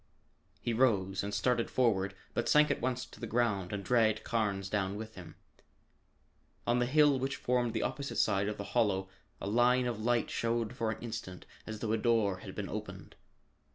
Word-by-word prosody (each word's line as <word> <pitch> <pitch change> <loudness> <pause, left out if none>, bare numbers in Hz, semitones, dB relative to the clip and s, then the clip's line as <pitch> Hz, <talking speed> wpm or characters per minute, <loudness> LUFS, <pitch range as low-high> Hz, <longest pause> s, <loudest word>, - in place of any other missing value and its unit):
He 120 - -2
rose 100 -6 +2
and 100 - -3
started 115 +3 +1
forward 100 -6 +1 0.2
but - - -1
sank 150 0 +5
at - - -1
once 125 +1 -1
to - - -15
the - - -5
ground 105 -6 0
and 100 -1 -3
dragged 110 -3 +3
Carnes 105 -4 -1
down 100 -1 -1
with 110 +1 -7
him. 90 -4 -11 1.3
On 120 +1 +2
the 120 - +1
hill 145 0 +4
which 135 +2 -1
formed 120 -2 0
the 110 - 0
opposite 140 -2 -3
side 100 -1 +2
of 105 - -3
the 100 - -4
hollow 100 -5 +1 0.3
a - - -6
line 120 +4 +3
of 120 -3 -2
light 120 +1 +1
showed 115 0 -1
for 115 -4 -1
an 110 - -3
instant 100 -6 -6 0.2
as 110 -1 -6
though 110 - -1
a 110 - +1
door 110 -4 +2
had - - -9
been - - -3
opened. - - -7
115 Hz, 190 wpm, -32 LUFS, 100-120 Hz, 1.3 s, sank